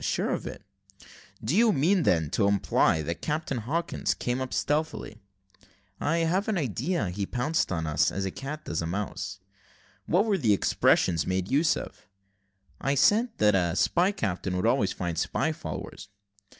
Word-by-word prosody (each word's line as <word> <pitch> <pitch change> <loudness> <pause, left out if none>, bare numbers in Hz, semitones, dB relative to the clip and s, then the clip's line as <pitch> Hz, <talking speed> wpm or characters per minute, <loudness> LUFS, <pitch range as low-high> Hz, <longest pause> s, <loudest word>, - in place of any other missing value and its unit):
"Sure - - 0
of - - -3
it." - - -8 0.8
"Do 120 +10 0
you 225 +1 +5
mean, 180 +4 +2
then, 80 - +1
to 100 - +2
imply 100 -5 +2
that 85 +2 -4
Captain 150 -4 -2
Hawkins 160 +10 -1
came 125 +1 -2
up 130 - -4
stealthily?" 150 -7 -2 0.8
"I 165 +2 +1
have 185 +6 0
an 215 -3 0
idea 130 - -1
he 100 +1 -3
pounced 140 +6 0
upon 80 -3 -2
us, 75 0 +2
as 95 0 -3
a 95 - -2
cat 150 +6 -7
does 80 - -2
a 80 - -3
mouse." 100 +1 -4 0.7
"What 190 +5 +3
were 205 -4 +1
the 110 -8 +3
expressions 85 -3 +2
made 95 +2 -1
use 150 +3 +3
of?" - - -9 0.7
"I 140 +1 0
said 215 - +4
that 105 0 +4
a 90 -2 +1
spy 170 - +2
captain 95 - -2
would 90 - -1
always 115 -5 +2
find 85 -3 -3
spy - - 0
followers." 100 - -7
115 Hz, 170 wpm, -27 LUFS, -, 0.8 s, you